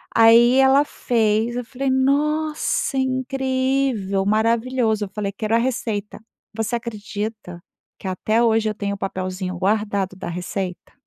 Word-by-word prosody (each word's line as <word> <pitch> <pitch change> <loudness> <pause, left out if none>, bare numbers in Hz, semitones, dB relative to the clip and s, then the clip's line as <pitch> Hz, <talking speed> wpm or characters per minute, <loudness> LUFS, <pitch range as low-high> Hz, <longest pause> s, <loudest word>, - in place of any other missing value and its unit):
aí 230 +2 +6
ela 270 +2 +5
fez 225 -1 0
eu 245 - -3
falei: 265 +3 -3
“Nossa 290 +2 +1
incrível, 260 -5 0
maravilhoso”, 225 +1 +1
eu - - -11
falei: 200 0 -3
“Quero 215 +2 -1
a - - +5
receita” 230 -4 -2 0.4
você 225 +1 -1
acredita 215 -5 -6 0.4
que - - -8
até 215 +5 +1
hoje 225 -1 +2
eu 215 - -4
tenho 200 -1 -3
o - - -10
papelzinho 185 -1 -4
guardado 200 0 0
da 185 - -6
receita? 180 +1 -5
225 Hz, 135 wpm, -22 LUFS, 200-260 Hz, 0.4 s, aí